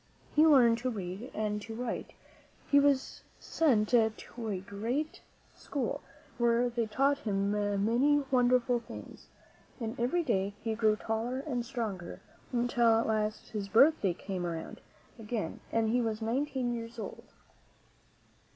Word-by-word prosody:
He 310 +1 +6
learned 240 -6 +6
to 255 +2 -1
read 200 +2 -5
and 210 -1 -2
to 225 +1 -7
write; 240 0 -4 0.6
he 285 - +7
went 280 -2 +3 0.3
to 240 -7 +3 0.3
a 220 -5 -4
great 230 +11 -3 0.3
school 280 -3 -3 0.4
where 235 +1 +3
they 235 -1 -1
taught 275 +6 +2
him 200 -5 0
many 220 +8 +2
won 250 -2 +4
derful 250 -1 +3
things, 230 - -11 0.5
and 225 0 -3
every 295 +9 +1
day 200 -7 0
he 225 0 -1
grew 220 -1 +3
taller 225 +4 -2
and 255 -5 -2
stronger, 220 -8 -5 0.3
until 240 -2 +3
at - - 0
last 215 -1 -1
his 205 -2 -4
birthday 220 - +4
came 190 -2 -4
around 165 -2 -5 0.4
again 215 -6 -4
and 225 -1 +1
he 245 +2 +2
was 220 -2 -1
nineteen 250 +2 -1
years 230 0 -6
old. 220 - -7
230 Hz, 140 wpm, -31 LUFS, 210-250 Hz, 0.6 s, he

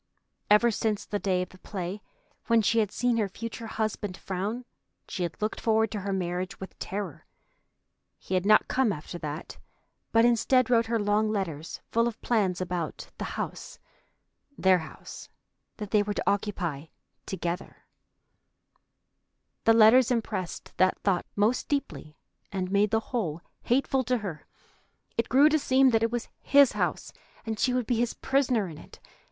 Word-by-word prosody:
Ever 210 +3 +5
since 210 -1 -1
the 205 - -3
day 185 -2 +1
of - - -9
the 185 - -17
play 190 +1 -5 0.5
when 230 -2 +4
she 230 +3 +3
had 210 -3 +1
seen 245 -1 +1
her 210 -3 0
future 230 +3 -6
husband 215 -3 -3
frown, 205 +6 -4 0.4
she 185 - -5
had 170 -2 -3
looked 215 +1 -2
forward 220 -1 +2
to 210 - -3
her 200 0 -3
marriage 180 -1 -3
with 190 - -9
terror. 195 -6 -5 0.9
He - - -7
had 185 -1 +2
not 215 +2 +5
come 260 -4 +2
after 170 +1 -6
that, 155 0 -6 0.5
but 225 0 +5
instead 250 +1 +3
wrote 230 -1 +4
her 230 0 +1
long 210 +1 +1
letters 170 -7 -3
full 230 +1 +3
of 225 -2 -5
plans 200 -7 +1
about 175 -3 -4
the - - -2
house, - - -5 0.8
their 190 -1 +4
house, 160 - -10 0.5
that 210 -2 -6
they 210 - +4
were 205 0 -2
to - - -3
occupy 180 -8 -1 0.4
together. 175 -1 -4 1.8
The 225 - +7
letters 225 +3 +7
impressed 215 -7 -3
that 185 0 +3
thought 185 -4 0
most 215 +5 +1
deeply 280 - -3 0.3
and 185 -1 -3
made 205 +1 +3
the 220 +1 +2
whole 175 -10 -2 0.2
hateful 265 +1 +1
to 250 +1 +1
her. 180 -9 -7 0.7
It 230 - -1
grew 275 +4 +6
to 310 0 +2
seem 265 -1 +4
that 225 -1 +3
it 230 - +2
was 240 -1 -3
his 280 -1 +5
house, - - -2 0.3
and 220 -1 -3
she 255 - +2
would 250 -1 0
be 240 +1 0
his 235 0 0
prisoner 255 -7 +1
in 155 -3 -9
it. - - -14
210 Hz, 165 wpm, -28 LUFS, 185-230 Hz, 1.8 s, The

